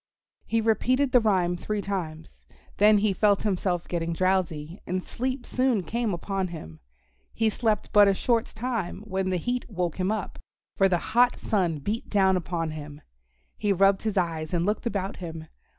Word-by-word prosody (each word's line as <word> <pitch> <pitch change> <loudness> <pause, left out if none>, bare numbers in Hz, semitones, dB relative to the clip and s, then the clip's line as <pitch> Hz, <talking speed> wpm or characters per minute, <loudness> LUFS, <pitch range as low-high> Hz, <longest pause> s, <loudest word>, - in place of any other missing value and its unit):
He 225 0 +1
repeated 255 +5 +2
the 250 - +6
rhyme 185 -6 +2
three 205 +3 -3
times. 165 -5 -5 0.4
Then 210 +1 +6
he 205 -1 +2
felt 205 +1 +2
himself 185 -4 -1
getting 170 -1 -2
drowsy 175 -2 0
and 185 0 -2
sleep 255 +1 -3
soon 255 -6 +1
came 230 +4 -1
upon 190 +2 -2
him. 80 - -9 0.6
He 225 -1 +2
slept 215 -2 -1
but 205 -1 +7
a 195 - +3
short 235 +2 +1
time 220 -5 -3
when 190 -3 -2
the 185 - +1
heat 245 +9 -3
woke 180 -5 -2
him 185 +2 0
up, 215 -4 -4 0.4
for 195 0 +4
the 180 - +2 0.2
hot 245 +1 +5
sun 180 -7 0
beat 205 +11 -4
down 190 -2 +3
upon 170 -2 -2
him. 150 -1 -8 0.6
He 205 -1 +1
rubbed 195 +1 +4
his 215 -2 -2
eyes 165 -2 -1
and 170 0 +1
looked 210 +4 -1
about 200 -3 -3
him. 165 -3 -7
195 Hz, 175 wpm, -26 LUFS, 175-220 Hz, 0.6 s, but